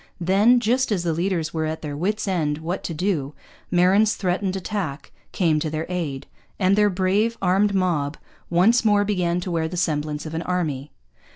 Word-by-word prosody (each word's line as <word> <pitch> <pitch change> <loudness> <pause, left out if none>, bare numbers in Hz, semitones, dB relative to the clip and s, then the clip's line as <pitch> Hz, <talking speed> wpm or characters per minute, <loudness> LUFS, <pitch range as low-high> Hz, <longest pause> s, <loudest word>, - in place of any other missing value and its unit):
Then, 200 +8 +4
just 245 +2 +1
as 185 -4 0
the 170 -2 0
leaders 170 -2 -1
were 160 -1 -1
at 160 +1 -5
their 145 -2 -4
wits' 205 +7 -1
ends 155 -6 0
what 170 +4 -4
to 170 - -3
do, 155 -5 -1 0.3
Marin's 190 +4 +4
threatened 185 0 -1
attack 185 -7 -4 0.2
came 160 -5 +1
to 155 - -2
their 155 +1 -3
aid; 160 -7 -3 0.3
and 190 0 +3
their 210 0 +4
brave 200 +5 +1
armed 195 +2 +2
mob 165 -6 0 0.3
once 195 +8 +4
more 205 -2 +3
began 180 -4 0
to 180 - -4
wear 165 -1 0
the 180 +2 -6
semblance 150 -3 -1
of 155 - -6
an 165 - -2
army. 155 -6 -2
180 Hz, 185 wpm, -23 LUFS, 160-200 Hz, 0.3 s, Then